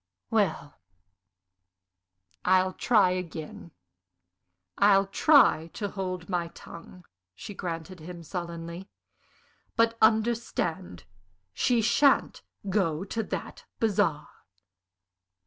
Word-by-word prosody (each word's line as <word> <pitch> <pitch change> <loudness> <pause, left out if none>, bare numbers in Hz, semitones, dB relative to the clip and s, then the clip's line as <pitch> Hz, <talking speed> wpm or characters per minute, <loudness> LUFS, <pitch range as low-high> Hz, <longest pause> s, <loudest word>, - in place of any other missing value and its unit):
"Well, 205 -9 -1 1.6
I'll 185 0 +3
try 210 -5 +3
again. 170 -3 -6 1.1
I'll 200 -1 +5
try 195 - +4
to 205 -2 -3
hold 185 -3 -5
my 175 -3 -1
tongue," 175 +1 -12 0.3
she 205 - -8
granted 175 -1 -6
him, 170 +2 -9
sullenly. 170 +2 -6 0.9
"But, 230 0 +2
understand, 220 - 0 0.5
she, 235 - +1
sha'n't 275 +6 +3 0.3
go 185 -4 0
to 225 +3 -3
that - - -6
bazaar!" 195 -9 +1
185 Hz, 85 wpm, -27 LUFS, 170-215 Hz, 1.6 s, I'll